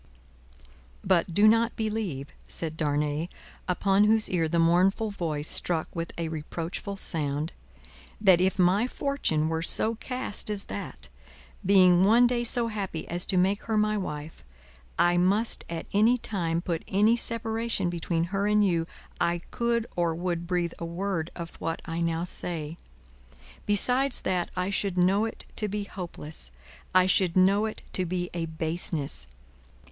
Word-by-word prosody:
"But, 180 -1 +2
do 205 +5 +5
not 230 +1 +3
believe," 210 -11 -3 0.2
said 160 -2 -2
Darnay, 150 +1 -1 0.4
upon 195 +2 +3
whose 220 0 +3
ear 165 -3 +1
the 170 - 0
mournful 185 +6 +3
voice 160 -6 -3
struck 165 -1 0
with 165 0 -3
a 170 -1 -2
reproachful 165 +5 -5
sound, 150 -2 -1 0.7
"that 190 -4 +5
if 190 +1 +1
my 190 +6 +3
fortune 255 - -1
were 160 0 -1
so 220 +6 +4
cast 250 -2 -4
as 205 -1 -1
that, - - -7 0.5
being 185 -2 +5
one 230 +5 +6
day 240 0 +1
so 235 0 +1
happy 195 -7 -4
as 175 +1 +2
to 185 - +2
make 195 +3 +2
her 220 -1 0
my 215 0 +2
wife, 155 -6 -5 0.5
I 175 0 +3
must 200 +6 +2
at 165 -1 -5
any 220 +5 +4
time 170 -7 -2
put 170 -3 -2
any 210 +4 +3
separation 225 -3 -1
between 170 -1 -1
her 200 +1 +1
and 210 0 +4
you, 165 -3 0 0.3
I 170 0 +1
could 235 -1 0
or 170 -2 0
would 170 0 -3
breathe 175 -2 -1
a - - -5
word 170 -1 -3
of 170 -1 -7
what 165 0 -3
I 165 +1 -3
now 165 0 0
say. 165 -3 -4 0.9
Besides 250 +6 +4
that 180 -2 -1
I 185 +2 -1
should 195 -2 -1
know 190 +4 +3
it 225 - -6
to 215 - 0
be 205 +1 -3
hopeless, 170 - -7 0.5
I 185 0 +6
should 185 -2 +2
know 200 +4 +4
it 215 - -6
to 185 - +1
be 180 0 -3
a 170 -1 -3
baseness. 160 - -3
180 Hz, 155 wpm, -27 LUFS, 165-210 Hz, 0.9 s, one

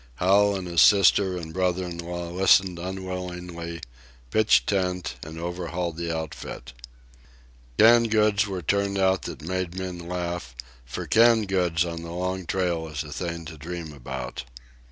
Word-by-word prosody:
Hal 100 +5 +4
and 95 -2 -4
his 85 -1 +3
sister 95 -1 +5
and 80 -2 -7
brother 90 0 0
in 85 -1 -6
law 85 0 -5
listened 95 0 +4
unwillingly, 90 -2 -5 0.5
pitched 110 +5 +4
tent, 90 -3 -1
and 80 +1 -8
overhauled 85 0 -3
the 85 -1 -2
outfit. 80 -5 -6 1.0
Canned 115 +1 +6
goods 105 -1 +3
were 95 -3 -4
turned 100 +4 0
out 95 -1 +2
that - - -9
made 90 +1 -3
men 90 -2 -4
laugh, 85 -6 -4 0.3
for - - -5
canned 115 -2 +4
goods 90 -3 +1
on 85 -1 -5
the 85 - -8
Long 90 +1 -3
Trail 85 -3 -1
is 75 0 -4
a 75 -1 -8
thing 85 0 -4
to 80 -1 -9
dream 85 0 -6
about. 65 -2 -6
90 Hz, 155 wpm, -25 LUFS, 85-95 Hz, 1.0 s, Canned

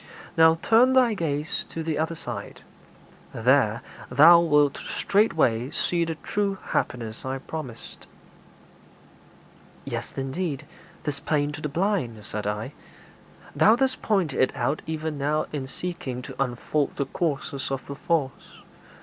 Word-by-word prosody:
Now 160 0 +6
turn 245 +3 +5
thy 255 -3 +5
gaze 155 -4 -2
to 165 - -5
the 155 -2 -1
other 160 +1 -1
side; - - -7 0.7
there 115 -2 +3 0.3
thou 170 +4 +8
wilt 150 -4 +3
straightway 155 - +1
see 170 +3 0
the 165 -1 -3
true 200 +4 -2
happiness 115 -3 -2
I 130 +1 -3
promised.' 135 -4 -8 1.8
'Yea, - - -2 0.2
indeed, 135 +2 -3 0.4
'tis 145 -2 -3
plain 145 0 0
to 150 +1 -7
the 150 - -2
blind.' 150 - -1
said 105 -1 -4
I. 105 +6 -3 0.8
'Thou 220 - +6
didst 260 +1 0
point 190 -9 +1
it 130 - +2
out 135 +3 -1
even 160 -2 -3
now 150 +2 +1
in 135 -3 -3
seeking 135 -5 -5
to 135 - -2
unfold 135 +3 -2
the 140 - -1
causes 140 -2 -2
of 135 -1 -3
the 140 - -6
false. 155 -4 -2
150 Hz, 135 wpm, -25 LUFS, 135-170 Hz, 1.8 s, thou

